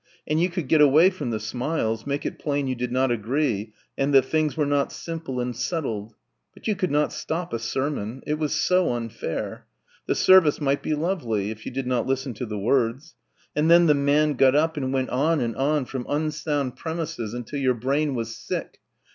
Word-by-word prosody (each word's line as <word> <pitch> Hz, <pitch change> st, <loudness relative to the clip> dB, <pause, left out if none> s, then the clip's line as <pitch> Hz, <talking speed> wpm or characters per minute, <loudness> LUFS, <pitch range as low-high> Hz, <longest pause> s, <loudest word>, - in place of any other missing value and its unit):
and 155 Hz, +2 st, +1 dB
you 180 Hz, -, +2 dB
could 170 Hz, -5 st, -4 dB
get 155 Hz, +2 st, +4 dB
away 155 Hz, +6 st, +6 dB
from 185 Hz, -9 st, -5 dB
the 110 Hz, -2 st, -2 dB
smiles, 115 Hz, 0 st, -2 dB
make 140 Hz, +1 st, -2 dB
it -, -, -4 dB
plain 145 Hz, -2 st, -1 dB
you 130 Hz, -, -1 dB
did 125 Hz, 0 st, -3 dB
not 130 Hz, 0 st, +2 dB
agree 115 Hz, -2 st, -1 dB, 0.2 s
and 135 Hz, +1 st, 0 dB
that 135 Hz, -1 st, +6 dB
things 155 Hz, +1 st, 0 dB
were 150 Hz, -, +2 dB
not 140 Hz, -1 st, +1 dB
simple 160 Hz, -6 st, -5 dB
and 125 Hz, 0 st, -2 dB
settled... 115 Hz, -, -3 dB, 0.4 s
but -, -, -9 dB
you 215 Hz, -, +2 dB
could 185 Hz, -2 st, -1 dB
not 150 Hz, +1 st, +1 dB
stop 170 Hz, +2 st, -4 dB
a 115 Hz, -, -1 dB
sermon. 130 Hz, 0 st, -3 dB
It 150 Hz, 0 st, -1 dB
was 150 Hz, -2 st, -1 dB
so 180 Hz, -6 st, +2 dB
unfair. 115 Hz, -7 st, -5 dB, 0.4 s
The -, -, +1 dB
service 185 Hz, -6 st, +6 dB
might 140 Hz, -1 st, +1 dB
be 155 Hz, -, -1 dB
lovely, 125 Hz, -, -1 dB
if 110 Hz, 0 st, -9 dB
you -, -, -4 dB
did 135 Hz, +1 st, -3 dB
not 125 Hz, -2 st, 0 dB
listen 135 Hz, -1 st, -1 dB
to 120 Hz, +3 st, -5 dB
the 105 Hz, -1 st, -4 dB
words; 125 Hz, +7 st, 0 dB, 0.4 s
and 150 Hz, +2 st, +2 dB
then 170 Hz, +1 st, +7 dB
the 150 Hz, -, +5 dB
man 145 Hz, +1 st, +2 dB
got 130 Hz, 0 st, +4 dB
up 160 Hz, +2 st, +2 dB
and 130 Hz, -3 st, -2 dB
went 130 Hz, -1 st, -1 dB
on 150 Hz, +5 st, +2 dB
and 115 Hz, -3 st, -2 dB
on 145 Hz, 0 st, +1 dB
from 125 Hz, -1 st, -5 dB
unsound 150 Hz, -3 st, -1 dB
premises 160 Hz, -9 st, -4 dB
until 125 Hz, +4 st, -5 dB
your 130 Hz, -2 st, +2 dB
brain 135 Hz, +4 st, 0 dB
was 115 Hz, -1 st, -3 dB
sick -, -, -5 dB
140 Hz, 205 wpm, -24 LUFS, 120-155 Hz, 0.4 s, then